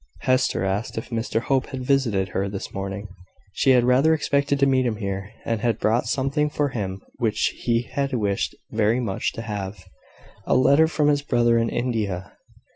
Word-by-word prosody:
Hester 130 -6 +1
asked 95 +4 -2
if 115 - -5
Mr 115 0 -1
Hope 135 0 0
had 130 -1 -6
visited 115 -9 +1
her 100 +2 -2
this 100 -1 -6
morning. 95 +1 -4 0.5
She 135 - +1
had 125 -2 +6
rather 135 +6 +4
expected 140 -1 +1
to 140 - +5
meet 130 -1 +3
him 120 -3 0
here, 100 -2 -4 0.2
and 115 -2 -1
had 115 -2 +1
brought 115 +2 +1
something 140 +3 0
for 145 -1 0
him 95 -6 -4 0.2
which 110 -2 +1
he 115 0 0
had 140 +2 -2
wished 105 -6 -1 0.2
very 110 +2 +2
much 105 -6 -1
to 115 - -6
have 100 -3 -5 0.6
a - - +3
letter 140 +5 +5
from 155 -2 +1
his 145 -1 +2
brother 120 -4 +2
in 115 0 +1
India. 110 -7 -2
115 Hz, 185 wpm, -24 LUFS, 105-135 Hz, 0.6 s, had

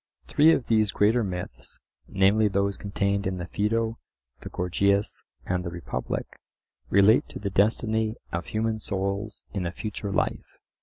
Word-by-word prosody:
Three 155 +2 +5
of 135 - +1
these 110 -3 +2
greater 115 +3 +3
myths, 90 -3 -6 0.3
namely 100 +3 +3
those 100 0 0
contained 100 0 -1
in 95 -1 -2
the 85 - -4
Phaedo, 110 +4 -1 0.4
the - - -8
Gorgias 100 +3 0 0.2
and 90 -1 -1
the 85 - -3
Republic, 85 0 -4 0.6
relate 100 +4 +5
to - - -7
the 100 -1 -3
destiny 110 +2 +2 0.2
of 85 +1 -3
human 110 0 -1
souls 100 +1 -3
in 95 -3 -1
a - - -3
future 100 +2 -5
life. - - -2
100 Hz, 150 wpm, -26 LUFS, 95-110 Hz, 0.6 s, Three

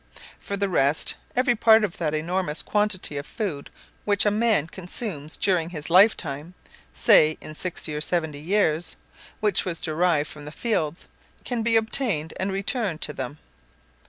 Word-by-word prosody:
For 200 - -5
the 200 0 0
rest, 150 -4 +2 0.2
every 250 0 +3
part 220 0 +5
of 195 -5 -3
that 155 -3 -1
enormous 165 0 -2
quantity 210 -8 +1
of 140 - -5
food 175 -11 -4 0.3
which 205 -1 +3
a 210 - +3
man 215 -7 +2
consumes 175 -3 -4
during 175 -4 +1
his 160 -2 -6
lifetime 175 -4 +3 0.2
( - - -29
say 155 0 +5
in 155 - -10
sixty 165 -1 -4
or 150 - -3
seventy 160 -2 -1
years), 170 -2 +1 0.5
which 210 -3 +3
was 170 -3 -4
derived 160 -2 +1
from 150 -1 -10
the 150 - -8
fields, 165 -6 -2 0.4
can 245 -2 -2
be 225 0 +2
obtained 220 - +2
and 190 +1 -1
returned 195 -2 -2
to 150 - -2
them. 135 +2 -6
175 Hz, 160 wpm, -24 LUFS, 155-210 Hz, 0.5 s, part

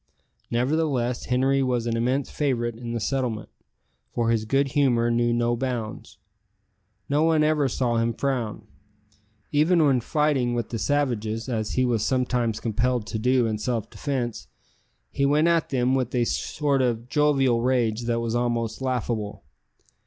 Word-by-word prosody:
Nevertheless 125 -1 0
Henri 135 +2 +2
was 125 -3 0
an 115 -1 -1
immense 125 +4 0
favourite 120 -5 -1
in 120 0 -6
the 115 - -1
settlement, 115 -1 -2 0.6
for 115 -1 0
his 110 -2 0
good 135 +4 +1
humour 120 -4 +2
knew 120 0 +2
no 120 0 +1
bounds. 115 -5 -4 0.9
No 145 +2 +1
one 160 -1 +3
ever 150 -2 +2
saw 120 -2 0
him 115 0 0
frown. 120 -6 -2 0.9
Even 155 +2 +4
when 135 -4 +3
fighting 140 -3 +1
with 120 -2 -2
the 115 - -4
savages, 120 -6 -1
as 110 -4 -2
he 130 - +2
was 115 -4 +1
sometimes 125 -4 0
compelled 120 +1 0
to 110 +1 -4
do 125 +1 +2
in 110 -2 -2
self 115 -1 -2
defence, 130 -5 -3 0.6
he 140 - -1
went 150 +3 +3
at 170 -1 +2
them 130 -1 +1
with 130 -2 -1
a 120 -1 +2
sort 140 +2 0
of 120 -2 -1
jovial 135 -4 +2
rage 120 -2 +1
that 115 0 0
was 115 -1 -2
almost 120 -1 -1
laughable. 120 - -2
125 Hz, 155 wpm, -25 LUFS, 115-135 Hz, 0.9 s, Even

